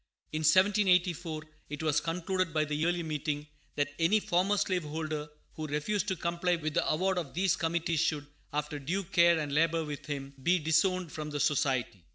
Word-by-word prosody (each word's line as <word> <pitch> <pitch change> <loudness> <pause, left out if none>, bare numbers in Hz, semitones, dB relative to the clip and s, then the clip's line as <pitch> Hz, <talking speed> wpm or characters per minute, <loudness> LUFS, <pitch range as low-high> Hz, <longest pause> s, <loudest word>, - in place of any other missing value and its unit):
In 155 - -1
1784 180 -2 +3 0.3
it 150 +1 -5
was 155 -2 +2
concluded 180 +1 -1
by 155 0 +3
the 150 - -4
Yearly 170 +3 0
Meeting 150 -1 -3 0.3
that 145 0 -1
any 175 +6 +4
former 195 +2 +1
slave 185 -2 +1
holder 155 0 -4 0.2
who 155 -1 -5
refused 170 +9 -1
to 190 - 0
comply 170 +1 0
with 155 -2 -3
the - - +1
award 185 +3 +1
of 150 -5 -7
these 185 +1 +2
committees 165 -1 0
should, 150 -2 0 0.3
after 150 0 -3
due 175 +8 -2
care 170 -2 +4
and 150 -2 -3
labor 165 +1 +2
with 145 0 -7
him, 140 -2 -5
be 175 +6 +3
disowned 175 +2 +1
from 150 -1 -5
the 145 -1 -3
Society. 130 - 0
160 Hz, 185 wpm, -30 LUFS, 150-180 Hz, 0.3 s, any